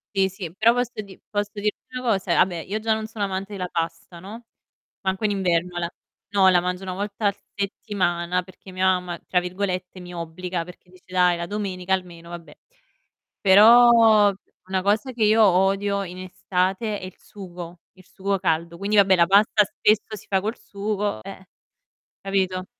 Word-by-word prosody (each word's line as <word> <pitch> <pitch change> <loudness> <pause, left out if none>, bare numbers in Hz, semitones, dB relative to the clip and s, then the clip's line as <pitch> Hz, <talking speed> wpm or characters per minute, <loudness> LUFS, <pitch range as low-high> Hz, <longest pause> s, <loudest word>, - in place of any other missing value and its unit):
Sì, 190 -1 +3
sì, 180 -3 -8
però 225 +3 +4
posso 245 -1 -1
di 195 -1 -14
posso 205 -1 -2
dirti 210 0 -1
una 255 - -5
cosa: 195 -4 +1
ah - - +7
beh, 175 -3 -5
io 205 +6 -4
già 220 0 +1
non 220 0 -3
sono 215 -2 -3
amante 195 +1 -4
della 185 -2 -4
pasta, 165 0 -5
no, 220 +6 -10 0.6
manco 190 +2 -2
in 210 - +2
inverno 180 -2 0
la 170 -1 -2 0.4
no, 195 -2 +4
la 180 -1 +5
mangio 180 +1 -3
1 185 -1 -4
volta 205 +2 -2
a 200 - 0 0.2
settimana 180 -3 -1
perché 185 +1 -15
mia 185 0 -1
mamma 180 -2 +1
tra 180 - +2
virgolette 185 0 -4
"mi 180 0 -10
obbliga" 170 +1 -4
perché 180 0 -15
dice: 185 0 -20
"Dai, 180 -1 +2
la 170 - -4
domenica 190 -3 -3
almeno". 175 -3 -4
Vabbè. 170 -3 -10 0.9
Però, 220 +1 +7 0.4
una 190 0 -1
cosa 210 +7 0
che 230 -3 0
io 220 +1 +5
odio 195 +1 +2
in 180 0 -9
estate 185 +3 -2
è - - -8
il 185 0 -9
sugo, 175 -3 -10
il 185 - -19
sugo 195 +1 -2
caldo. 170 -1 -1
Quindi 200 +3 -1
vabbè, 195 -2 +6
la 170 - +4
pasta 205 +2 +4
spesso 215 +1 0
si - - -14
fa 190 -1 +2
col 215 +4 -3
sugo, 205 - -3
eh. 190 -1 -10 0.8
Capito? 190 -1 -1
190 Hz, 180 wpm, -23 LUFS, 180-205 Hz, 0.9 s, ah